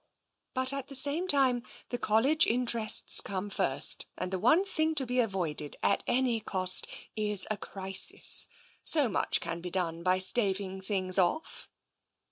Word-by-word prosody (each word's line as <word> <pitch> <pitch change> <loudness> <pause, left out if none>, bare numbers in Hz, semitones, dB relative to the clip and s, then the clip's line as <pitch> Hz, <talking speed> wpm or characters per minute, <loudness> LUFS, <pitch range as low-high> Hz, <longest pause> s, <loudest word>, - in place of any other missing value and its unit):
But 260 +1 +1
at 275 -1 -6
the 275 - -5
same 290 +7 +1
time, 265 -6 +1 0.3
the 245 - -5
Col 220 -1 0
lege 310 +4 +2
interests 235 -2 +1
come 200 +1 -7
first, 145 -8 0
and 185 0 -4
the 190 - -3
one 310 - +2
thing 315 -4 -1
to 275 -3 +1
be 250 +1 -3
avoided, 175 -10 -3
at - - +1
any 245 -2 0
cost, 185 -3 +1 0.3
is 210 -3 +2
a 215 - -3
crisis. 195 -1 +3 0.4
So 295 -5 +4
much 215 - -2
can 170 +1 -6
be 180 - -7
done 170 -2 -4
by 185 +1 0
staving 190 -1 +1
things 190 -1 0
off." 190 - -3
210 Hz, 160 wpm, -28 LUFS, 185-260 Hz, 0.4 s, So